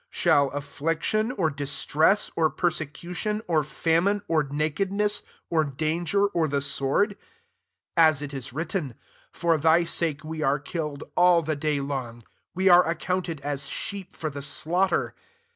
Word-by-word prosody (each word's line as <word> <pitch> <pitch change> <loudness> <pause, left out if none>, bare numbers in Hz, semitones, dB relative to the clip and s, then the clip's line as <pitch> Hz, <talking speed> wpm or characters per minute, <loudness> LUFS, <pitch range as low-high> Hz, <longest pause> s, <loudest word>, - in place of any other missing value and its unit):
%hall 140 -1 +3
affliction, 160 - -1
or 170 -9 0
distress, 145 +6 +2
or 160 -1 +3
perse 175 0 0
cution, 175 +8 -4
or 160 -3 +2
famine, 170 +7 +1
or 160 -2 +2
naked 155 +6 -2
ness, 210 +1 0 0.3
or 160 -2 +3
danger, 160 +7 0
or 170 -5 0
the 140 -1 0
sword? 140 +7 +1
36 200 - -16 0.7
(As 155 -3 +5
it 145 -1 -6
is 135 -3 -5
written, 155 - -3 0.2
" - - -32
For 165 -2 +1
thy 160 +3 +4
sake 165 -3 -2
we 155 0 -5
are 140 -1 +2
killed 150 0 -5
all 175 -1 +5
the 155 0 -1
day 150 0 -1
long; 130 -4 -5 0.3
we 190 +2 +1
are 180 -1 +8
accounted 170 -2 -2
as 140 -1 -2
sheep 195 -2 -4
for 155 -2 -5
the 140 +1 -6
slaughter.") 175 +6 0
160 Hz, 160 wpm, -26 LUFS, 145-180 Hz, 0.7 s, are